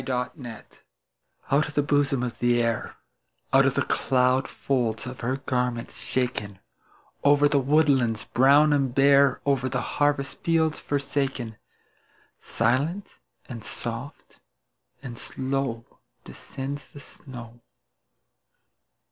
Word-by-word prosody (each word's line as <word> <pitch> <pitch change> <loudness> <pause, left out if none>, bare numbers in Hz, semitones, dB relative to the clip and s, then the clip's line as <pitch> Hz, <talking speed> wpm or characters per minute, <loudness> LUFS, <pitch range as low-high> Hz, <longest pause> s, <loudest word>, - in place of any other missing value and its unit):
SNOW 125 -1 -2
FLAKES 120 -7 -11 0.7
Out 145 +2 +3
of 150 - -9
the 145 - +3
bosom 140 -3 +1
of 120 -2 -4
the 120 0 +2
Air, 115 -1 -2 0.6
Out - - +6
of - - 0
the - - +2
cloud 130 +1 +2
folds 120 -5 -1
of 125 0 -7
her 130 +3 -1
garments 125 -3 -2
shaken, 120 -6 -3 0.7
Over 145 0 +5
the 145 -1 +2
woodlands 135 -5 +2
brown 145 +4 +4
and 135 -3 0
bare, 140 0 +5
Over 135 -2 +1
the 130 - -1 0.2
harvest 145 -1 +1
fields 160 -2 +1
forsaken, 135 -5 -2 0.8
Silent, 140 - -1 0.3
and 115 -4 -8
soft, 120 +7 -7 0.6
and 120 -3 -8
slow 130 -3 -3 0.4
Descends 140 +1 -7
the 145 - -13
snow. 120 -4 -12
135 Hz, 115 wpm, -25 LUFS, 120-140 Hz, 0.8 s, Out